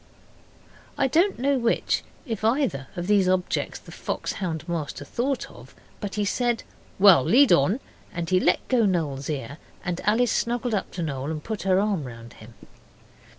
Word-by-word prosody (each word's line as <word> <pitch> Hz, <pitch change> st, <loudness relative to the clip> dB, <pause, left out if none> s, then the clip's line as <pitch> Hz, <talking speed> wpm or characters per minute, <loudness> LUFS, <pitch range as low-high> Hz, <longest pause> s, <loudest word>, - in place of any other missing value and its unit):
I 270 Hz, -, +3 dB
don't 345 Hz, +9 st, +2 dB
know 275 Hz, +1 st, +1 dB
which, 235 Hz, -1 st, +1 dB, 0.2 s
if 225 Hz, -3 st, -4 dB
either, 225 Hz, -, +1 dB
of 175 Hz, -, -3 dB
these 200 Hz, -2 st, +3 dB
objects 185 Hz, -1 st, 0 dB
the -, -, -14 dB
fox -, -, -4 dB
hound 165 Hz, -4 st, -4 dB
master 155 Hz, -4 st, -4 dB
thought 255 Hz, -, -2 dB
of, -, -, -15 dB, 0.2 s
but 205 Hz, -2 st, -5 dB
he 210 Hz, -1 st, 0 dB
said 240 Hz, +3 st, 0 dB, 0.3 s
'Well, 190 Hz, -8 st, +7 dB
lead 260 Hz, -, +5 dB
on,' 185 Hz, -, +3 dB, 0.3 s
and 170 Hz, -1 st, -4 dB
he 185 Hz, +1 st, +3 dB
let 180 Hz, -, +1 dB
go 235 Hz, -5 st, +3 dB
Noel's 150 Hz, -7 st, -1 dB
ear 145 Hz, +1 st, -4 dB, 0.3 s
and 180 Hz, -1 st, -2 dB
Alice 225 Hz, +2 st, +3 dB
snuggled 240 Hz, 0 st, -1 dB
up 200 Hz, -, -1 dB
to 175 Hz, -, -3 dB
Noel 140 Hz, -2 st, -3 dB
and 155 Hz, -1 st, -4 dB
put 220 Hz, -2 st, -4 dB
her 185 Hz, 0 st, +5 dB
arm 200 Hz, -7 st, 0 dB
round 115 Hz, -1 st, -10 dB
him. 115 Hz, +1 st, -14 dB
190 Hz, 175 wpm, -25 LUFS, 155-235 Hz, 0.3 s, Well